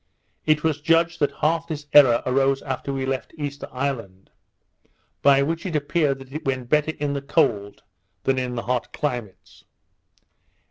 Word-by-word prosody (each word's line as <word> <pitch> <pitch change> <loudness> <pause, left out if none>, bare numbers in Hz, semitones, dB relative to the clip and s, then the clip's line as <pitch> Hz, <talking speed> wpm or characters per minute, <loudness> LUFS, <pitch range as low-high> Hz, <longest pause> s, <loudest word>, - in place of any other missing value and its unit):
It 155 -1 +3
was 155 -2 0
judged 165 +2 +2
that 145 - +2
half 165 +2 +1
this 150 -3 -5
error 130 -5 +7
arose 135 +1 +2
after 135 0 -4
we 135 -1 -2
left 135 +3 -4
Easter 145 -1 -5
Island; 115 -8 -4 0.9
by 140 -1 +5
which 165 +3 -2
it 180 -5 -4
appeared 145 -1 +1
that 135 0 -13
it 155 - -5
went 130 -3 -2
better 150 +1 +2
in 145 -1 -1
the 140 - -3
cold 110 -9 0 0.4
than 135 -1 +1
in 125 -1 -3
the 115 - -3
hot 125 -1 -2
climates. 120 -9 -5
140 Hz, 165 wpm, -23 LUFS, 130-150 Hz, 0.9 s, error